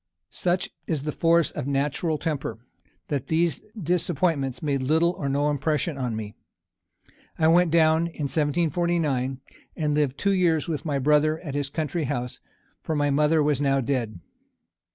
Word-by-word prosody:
Such 180 +1 -1 0.2
is 155 -5 -1
the 150 - -2
force 165 +1 +2
of 145 -3 -5
natural 145 +3 0
temper, 145 -8 -3 0.5
that 140 -2 -2
these 165 0 +1 0.2
disappointments 160 -6 0
made 140 -3 0
little 160 +6 +3
or 145 -6 -4
no 140 +2 +1
impression 150 +3 -1
on 125 -4 -2
me. 105 -1 -5 1.0
I 160 - +3
went 175 +1 +5
down, 160 0 +3
in 165 -2 -6
1749, 150 -3 0 0.4
and 150 -2 0
lived 145 -2 0
two 200 -1 +1
years 170 -4 +2
with 155 -3 -3
my 145 -3 0
brother 150 +3 +3
at 150 -6 -6
his 145 -1 -2
country 155 +1 -2
house, 125 -3 -3 0.4
for 160 - -2
my 145 -1 +1
mother 150 +2 +3
was 145 -2 +1
now 135 -1 +2
dead. 120 -7 -2
150 Hz, 155 wpm, -25 LUFS, 140-165 Hz, 1.0 s, went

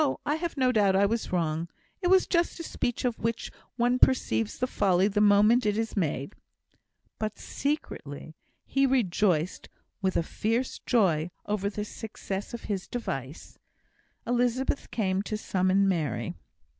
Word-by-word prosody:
I 295 - +1
have 335 -2 -4
no 255 -1 +3
doubt 205 -5 +3
I 200 +1 +5
was 225 +3 -1
wrong. 165 -1 -1 0.3
It 360 - +1
was 375 0 +5
just 340 -1 0
a - - -4
speech 245 -5 -2
of 240 -2 -1
which 230 +1 -2 0.2
one 245 +1 +2
perceives 110 - +2
the 255 - +1
folly 195 -6 +2
the 205 0 +1
moment 210 +4 +5
it 210 0 +1
is 225 0 -2
made." 160 -3 -1 0.9
But, 215 -1 -3
secretly, 155 - -4 0.3
he 275 0 +2
rejoiced 190 -9 +1 0.3
with 190 -1 +1
a - - +2
fierce 230 +9 -1
joy 175 -9 +3 0.2
over 205 -1 -1
the 210 0 -4
success 205 -3 -6
of 235 - -7
his 195 -3 -3
device. 140 - -5 0.7
Elizabeth 245 +3 0
came 190 -4 0
to 215 +1 -3
summon 190 -1 +2
Mary. 145 - -1
210 Hz, 150 wpm, -28 LUFS, 185-245 Hz, 0.9 s, I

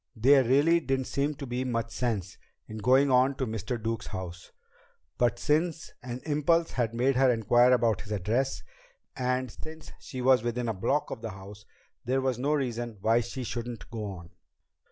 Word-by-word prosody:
There 135 +4 +5
really 145 +7 +4
didn't 135 -3 -1
seem 145 +3 -1
to 140 - -7
be 125 0 -2
much 115 -2 -2
sense 105 -7 -3 0.3
in 110 0 -7
going 130 +5 +4
on 130 +2 +4
to 130 - -2
Mr. 110 +1 -3
Duke's 115 0 -3
house. 90 -3 -7 0.7
But 120 -2 +2
since 160 +2 0
an 125 0 -6
impulse 160 +2 +2
had 115 -2 -1
made 130 +3 +2
her 135 0 +5
inquire 120 +2 +4
about 115 -5 +2
his 105 - -10
address, 110 +7 -1 0.5
and 125 -1 -1
since 160 +5 -11
she 130 -5 -8
was 130 -1 +4
within 120 +1 -2
a 115 - 0
block 135 +10 -1
of - - -6
the 115 - -4
house, 100 +1 -11 0.4
there 130 +2 0
was 130 -2 -1
no 145 +4 +1
reason 120 -5 -3
why 115 +3 +3
she 120 +3 -5
shouldn't 120 0 -6
go 110 -2 -4
on. 90 -4 -8
125 Hz, 180 wpm, -28 LUFS, 110-135 Hz, 0.7 s, There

